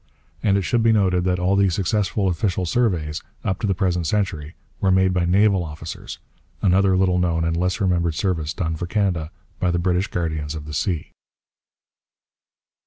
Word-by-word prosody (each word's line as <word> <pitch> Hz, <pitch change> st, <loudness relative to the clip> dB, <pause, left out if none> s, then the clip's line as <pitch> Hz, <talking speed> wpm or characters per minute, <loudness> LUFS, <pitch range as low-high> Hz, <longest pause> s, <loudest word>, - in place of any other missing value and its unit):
And 100 Hz, -1 st, +2 dB
it 100 Hz, -, 0 dB
should 120 Hz, +4 st, +1 dB
be 115 Hz, 0 st, +4 dB
noted 95 Hz, -4 st, +2 dB
that 90 Hz, -1 st, +1 dB
all 90 Hz, +2 st, +1 dB
the 100 Hz, -1 st, +4 dB
successful 100 Hz, +2 st, 0 dB
official 90 Hz, +1 st, 0 dB
surveys, 85 Hz, -8 st, 0 dB, 0.2 s
up 95 Hz, -1 st, -1 dB
to 110 Hz, -, -1 dB
the 95 Hz, -, +1 dB
present 90 Hz, -3 st, 0 dB
century, 90 Hz, -5 st, -2 dB, 0.2 s
were 95 Hz, -, +1 dB
made 95 Hz, 0 st, +3 dB
by 90 Hz, -1 st, +1 dB
naval 95 Hz, +1 st, +3 dB
officers 80 Hz, +1 st, -7 dB, 0.4 s
another 95 Hz, 0 st, +3 dB
little 90 Hz, -1 st, +2 dB
known 85 Hz, -2 st, +1 dB
and 85 Hz, 0 st, 0 dB
less 90 Hz, +3 st, 0 dB
remembered 85 Hz, -5 st, +1 dB
service 80 Hz, -5 st, -1 dB
done 85 Hz, -2 st, -2 dB
for 85 Hz, +2 st, -4 dB
Canada 90 Hz, -6 st, 0 dB, 0.3 s
by 90 Hz, -, +1 dB
the 85 Hz, -, +1 dB
British 90 Hz, +2 st, +1 dB
guardians 80 Hz, -3 st, -3 dB
of 75 Hz, -1 st, -7 dB
the 75 Hz, -, -7 dB
sea. 85 Hz, +1 st, -2 dB
90 Hz, 175 wpm, -22 LUFS, 85-95 Hz, 0.4 s, be